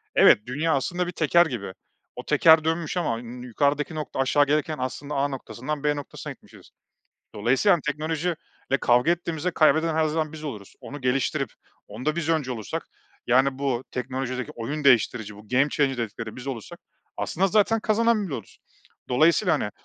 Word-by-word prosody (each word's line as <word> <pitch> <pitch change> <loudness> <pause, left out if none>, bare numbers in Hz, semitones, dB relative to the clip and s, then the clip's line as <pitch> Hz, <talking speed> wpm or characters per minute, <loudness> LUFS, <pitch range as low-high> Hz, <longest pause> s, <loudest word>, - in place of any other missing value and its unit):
evet - - +7
dünya 150 +6 0
aslında 175 +6 -1
bir - - -3
teker 170 +1 +4
gibi. 115 - -5 0.4
O - - -8
teker 160 -1 +6
dönmüş 165 +1 -1
ama 150 -10 0
n 120 +1 -9
nü 125 - -8
yukarıdaki 145 +5 0
nokta 150 -3 -5
aşağı 145 +2 +3
gelirken 150 +2 0
aslında 135 +3 -4
A 140 +1 +2
noktasından 140 +1 -5
B 150 0 +2
noktasına 145 -1 -7
gitmişiz. - - -18 0.7
Dolayısıyla 125 - +3
yani, 175 - +2
teknoloji 155 +3 -1 0.4
ile 135 - +3
kavga 125 +5 +3
ettiğimizde 170 -1 -1
kaybeden 160 0 +3
her 160 0 +2
zaman 155 0 -1
biz 155 -1 -9
oluruz. 105 -9 -7
Onu 145 +1 -8
geliştirip 130 +1 0 0.4
onda 125 +10 -3
biz 165 -2 -2
öncü 155 -5 +1
olursak 110 -5 -5 0.4
yani, 130 +2 +3
bu 135 -3 -1
teknolojideki 130 0 -4
oyun 145 +6 -4
değiştirici, 115 -5 +3
bu 105 +1 -15
game 130 +5 +3
changer 140 -3 0
dedikleri 115 -1 -5
biz 125 +1 -9
olursak 125 -6 -6 0.4
aslında 190 +3 0
zaten 215 +3 +3
kazanan 220 0 +2
biz 165 - -7
oluruz. 115 -7 -7 0.5
Dolayısıyla 165 +8 +3
hani, 105 - -2
145 Hz, 170 wpm, -25 LUFS, 125-160 Hz, 0.7 s, evet